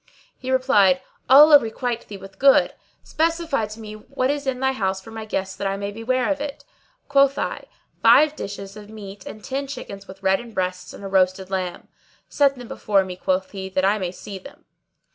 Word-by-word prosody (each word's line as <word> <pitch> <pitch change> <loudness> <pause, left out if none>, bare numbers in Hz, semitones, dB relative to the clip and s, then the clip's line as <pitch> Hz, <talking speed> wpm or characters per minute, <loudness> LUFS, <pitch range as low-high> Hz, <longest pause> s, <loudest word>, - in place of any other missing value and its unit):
He 255 - -8
replied, 210 -9 +4 0.3
"Allah 290 +2 +9
requite 235 0 -4
thee 205 - -8
with 195 0 -13
good! 275 0 +5 0.3
Specify 325 -7 0
to 215 +1 -10
me 215 -1 -8
what 255 +5 -2
is 290 -1 -4
in 255 -1 -1
thy 265 0 +2
house 190 -6 -1
for 225 +4 -13
my 220 0 -7
guests 190 -2 -3
that 200 - -3
I 195 0 -2
may 200 0 -4
be 225 +2 -9
ware 255 +3 +1
of 290 -1 -2
it." 290 -1 -6 0.4
Quoth 275 0 +4
I, - - -3 0.4
"Five 305 0 +6
dishes 200 -5 -7
of 210 -1 -11
meat 200 -3 -10
and 215 - -9
ten 275 +1 -3
chickens 200 -7 -8
with 195 +1 -13
reddened 200 +4 0
breasts[FN#618] 185 -1 -3
and - - -12
a - - -4
roasted 190 0 +1
lamb." 185 -2 -3 0.4
"Set 280 -1 +2
them 245 -2 -10
before 200 -3 +1
me," 185 -1 -6
quoth 185 +1 -1
he 190 -1 -6
"that 190 0 0
I 205 +2 +2
may 180 -2 -3
see 195 +1 -9
them." 275 +10 -15
215 Hz, 205 wpm, -22 LUFS, 195-265 Hz, 0.4 s, Allah